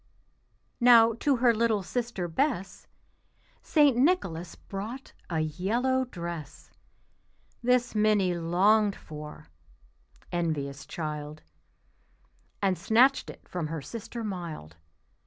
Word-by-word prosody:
Now 235 -2 +7
to 285 -2 +2
her 240 -1 +4
little 225 -3 +1
sister 235 -4 -3
Bess 195 - -2 0.7
St. 290 -5 +4
Nicholas 240 - +1
brought 220 +7 -7 0.2
a 160 -3 0
yellow 230 - 0
dress; 170 - -8 0.9
This 245 0 +2
Minnie 210 -4 +3
longed 195 +5 +3
for 150 - -10 0.8
(envious 145 -5 -2
child), 150 -1 -5 1.2
And 190 -2 +1
snatched 255 +5 +3
it - - -12
from 175 -4 -3
her 155 -2 -5
sister 230 - -7
mild. 170 - -6
195 Hz, 100 wpm, -28 LUFS, 165-240 Hz, 1.2 s, Now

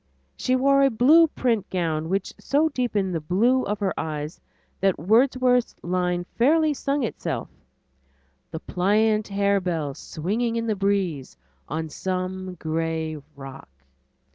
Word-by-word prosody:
She 255 - 0
wore 275 +2 +4
a 275 - +5
blue 285 +8 +6
print 230 -8 -1
gown 160 -3 -1
which 195 +1 -1
so 300 +3 +2
deepened 215 - -1
the 165 - -1
blue 230 +11 +2
of 210 0 -2
her 190 -2 0
eyes 150 0 -5 0.4
that 195 -1 +2
Wordsworth's 250 - +2
line 180 0 0 0.2
fairly 305 +5 +4
sung 280 0 -1
itself: 230 - -3 1.0
The 160 - -6
pliant 210 +3 +1
harebell 190 -7 0
swinging 220 - -3
in 230 0 -1
the 220 -2 0
breeze 190 - -1 0.3
On 160 +2 -3
some 185 +2 -4
gray 160 -1 -2 0.2
rock. 135 - -10
195 Hz, 130 wpm, -24 LUFS, 165-245 Hz, 1.0 s, blue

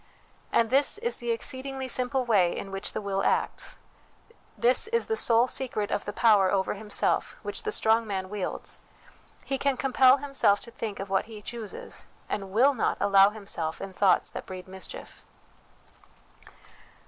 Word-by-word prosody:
And 230 0 +2
this 275 +8 +4
is 470 +2 -1
the 240 -1 -6
exceedingly 260 +3 -2
simple 255 +1 0
way 195 -7 +3
in 195 - -6
which 195 +1 -3
the - - -3
will 195 -1 -2
acts; - - -1 0.8
this 250 - +3
is 465 +1 0
the 445 - -1
sole 235 - +4
secret 235 -6 -3
of - - -1
the 205 - -3
power 205 -3 +4
over 190 -1 +1
himself 210 +1 -1
which - - -4
the 430 - -3
strong 225 - +3
man 190 -2 -3
wields 205 -1 -4 0.7
he 270 -1 -1
can 280 -2 +1
compel 260 0 +5
himself 275 -8 +2
to 235 - -9
think 215 -3 -5
of 195 0 -6
what 195 - +1
he 220 -1 -10
chooses, 220 0 -7 0.2
and 195 -2 -3
will 255 +8 +4
not 245 - 0
allow 200 0 +6
himself 195 -7 -4
in 195 -1 -7
thoughts 195 0 +2
that - - -7
breed 185 0 -8
mischief. 190 0 -8
220 Hz, 165 wpm, -27 LUFS, 195-260 Hz, 0.8 s, allow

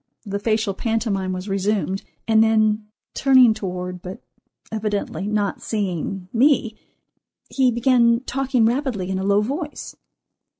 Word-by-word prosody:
The 200 0 -3
facial 215 -1 0
pantomime 215 -4 -1
was 185 +2 -5
resumed, 195 0 -1 0.3
and 220 -1 +5
then 215 -1 +2 0.3
turning 260 -4 +5
toward, 180 -3 -5
but 185 +1 -8 0.5
evidently 210 -2 -3
not 210 -1 -1
seeing, 195 -3 -3
me, 245 -3 +3 0.8
he 265 -2 +3
began 235 0 +3
talking 260 -2 0
rapidly 235 -6 -1
in 190 - -1
a - - -3
low 200 +1 +3
voice. 295 +7 -5
215 Hz, 125 wpm, -22 LUFS, 195-235 Hz, 0.8 s, and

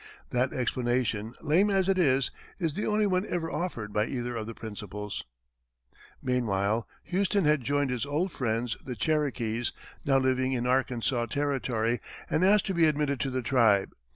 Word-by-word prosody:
That 125 +2 +1
explanation, 120 -3 -1
lame 180 +8 +3
as 195 -2 +2
it 190 -1 +2
is, 135 -5 +3 0.3
is 165 -5 -1
the 205 - -2
only 215 0 +2
one 185 -2 +2
ever 165 -2 -2
offered 120 - -3
by 105 +1 +1
either 120 -2 -3
of 110 -1 -4
the 115 - -6
principals. 105 -1 -6 1.0
Meanwhile, 110 -3 0 0.2
Houston 195 0 +1
had 150 -2 +4
joined 145 +2 0
his 125 -3 -1
old 160 +6 0
friends, 115 -2 -1
the 125 - -5
Cherokees, 120 -4 0 0.3
now 135 -1 +3
living 130 0 +1
in 120 -1 -1
Arkansas 125 -1 +1
Territory, 125 -4 0 0.3
and 160 - +2
asked 205 +2 +5
to 195 - -1
be 170 -2 +4
admitted 145 -3 +1
to 135 - -1
the 130 -1 -2
tribe. 110 -5 +3
130 Hz, 165 wpm, -29 LUFS, 115-155 Hz, 1.0 s, asked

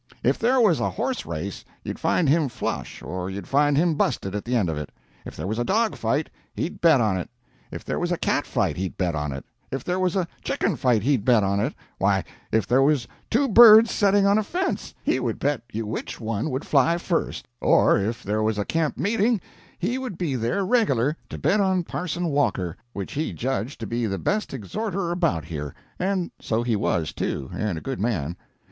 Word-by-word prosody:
If - - +2
there 255 +3 +3
was 210 -9 +4
a - - +1
horse 250 +4 -3
race, 85 +4 -5 0.2
you'd - - -5
find 165 - +2
him 150 0 +3
flush 120 - -4
or 90 0 -4
you'd 95 -1 -6
find 145 0 +3
him 165 +2 +3
busted 115 -9 -1
at 105 - -4
the 125 +1 -1
end 105 -7 +2
of 80 - -1
it; 75 -1 -6 0.3
if - - -8
there - - -5
was 110 +4 -2
a - - +2
dog 220 - +1
fight, 135 +7 0 0.3
he'd 170 - -4
bet 160 -5 +6
on 105 -5 +2
it; 90 - -5 0.4
if - - -8
there - - -2
was - - -1
a - - +1
cat - - 0
fight, - - 0
he'd 95 0 -4
bet 90 -3 0
on 75 -2 -2
it; 70 +1 -6 0.2
if 135 - -4
there 180 +1 -1
was 185 -1 +1
a 185 -3 +1 0.2
chicken - - 0
fight, 120 -6 +2
he'd 130 -4 +2
bet 120 -5 +4
on 100 +1 +1
it; - - -1 0.2
why, - - +2 0.3
if 110 - +2
there 125 +2 +3
was 140 -3 +2 0.2
two 275 +5 +2
birds 225 -1 +9
setting 200 -1 +3
on 200 +2 +4
a - - 0
fence, 360 - -3
he 130 - +1
would 120 -3 -2
bet 145 -3 0
you 110 +1 -3
which 105 - -5
one 115 +4 -2
would 130 +2 -3
fly 155 +4 +3
first; 175 -1 -2
or - - +4
if 110 +4 -2
there 105 +2 -1
was 110 -1 0
a 105 - -1
camp 160 -2 -1
meeting, 220 +2 +2 0.4
he 245 +9 -1
would 250 -9 -5
be 160 -7 -1
there 125 - 0
reg'lar 155 - +2
to - - -6
bet 210 - +2
on 190 -2 +2
Parson 175 0 -3
Walker, 105 - 0 0.2
which 100 -5 -6
he 155 +3 -2
judged 125 0 -3
to 115 - -4
be 115 +2 -1
the 95 -1 -2
best 210 - -1
exhorter 180 - -3
about 170 - 0
here, 75 -3 -5 0.2
and 185 -1 -1
so 115 +1 -1
he 120 -2 +1
was 85 -5 0
too, 65 -2 -3
and 105 -6 -2
a - - -6
good 135 -2 -4
man. 90 -8 -1
135 Hz, 220 wpm, -24 LUFS, -, 0.4 s, birds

